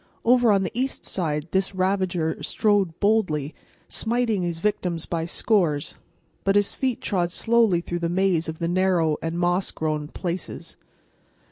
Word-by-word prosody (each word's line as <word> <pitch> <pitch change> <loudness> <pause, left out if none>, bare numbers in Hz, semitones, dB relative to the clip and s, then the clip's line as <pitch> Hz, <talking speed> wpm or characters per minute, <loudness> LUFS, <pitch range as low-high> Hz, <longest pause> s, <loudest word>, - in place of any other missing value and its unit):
Over 245 -1 +5
on 195 -1 +3
the 185 - -3
east 260 +3 -2
side 155 -4 -2
this 190 0 0
ravager 185 -4 0
strode 205 -6 +1
boldly, 185 -9 +1 0.3
smiting 230 -3 0
his 170 -2 -2
victims 175 -3 -1
by 165 -1 -2
scores, 170 -6 +1 0.5
but 195 0 +2
his 205 -1 +2
feet 260 -3 -1
trod 175 -4 0
slowly 225 -4 +3
through 175 0 -4
the 170 -1 -1
maze 175 -2 +1
of 160 - -5
the 165 - -2
narrow 175 -4 +2
and 165 +1 -3
moss 175 +2 +1
grown 155 -1 -2
"places." 175 +3 -5
180 Hz, 150 wpm, -24 LUFS, 165-205 Hz, 0.5 s, Over